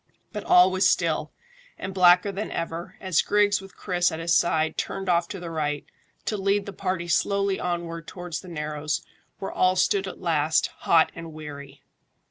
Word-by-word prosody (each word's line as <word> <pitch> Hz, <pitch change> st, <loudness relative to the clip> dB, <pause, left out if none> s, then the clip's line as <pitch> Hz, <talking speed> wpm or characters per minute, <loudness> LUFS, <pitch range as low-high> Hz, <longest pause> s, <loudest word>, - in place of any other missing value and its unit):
But 210 Hz, -2 st, -5 dB
all 180 Hz, +1 st, +6 dB
was 190 Hz, +1 st, +3 dB
still, -, -, 0 dB, 0.5 s
and 190 Hz, 0 st, -5 dB
blacker 180 Hz, +1 st, +5 dB
than 200 Hz, +2 st, -4 dB
ever, 165 Hz, +1 st, -5 dB
as 185 Hz, -4 st, +2 dB
Griggs 205 Hz, -1 st, +2 dB
with 195 Hz, 0 st, -14 dB
Chris 180 Hz, -2 st, +1 dB
at 160 Hz, -, -4 dB
his 165 Hz, +1 st, +1 dB
side 160 Hz, -2 st, +2 dB
turned 195 Hz, 0 st, -4 dB
off 170 Hz, -1 st, +2 dB
to 195 Hz, -, -6 dB
the 170 Hz, -1 st, -6 dB
right, 150 Hz, -2 st, -2 dB, 0.4 s
to 210 Hz, -, -1 dB
lead 200 Hz, +1 st, +1 dB
the 200 Hz, -, -7 dB
party 185 Hz, -2 st, -2 dB
slowly 200 Hz, +3 st, +1 dB
onward 170 Hz, -1 st, -3 dB
towards 175 Hz, -2 st, -6 dB
the 185 Hz, -, -13 dB
narrows, 150 Hz, -2 st, -3 dB, 0.3 s
where 195 Hz, -, -5 dB
all 185 Hz, 0 st, +2 dB
stood 190 Hz, +1 st, +2 dB
at -, -, -8 dB
last, 155 Hz, -2 st, +1 dB
hot 165 Hz, -1 st, +4 dB
and 165 Hz, -1 st, -9 dB
weary. 145 Hz, -2 st, -10 dB
175 Hz, 180 wpm, -25 LUFS, 160-195 Hz, 0.5 s, all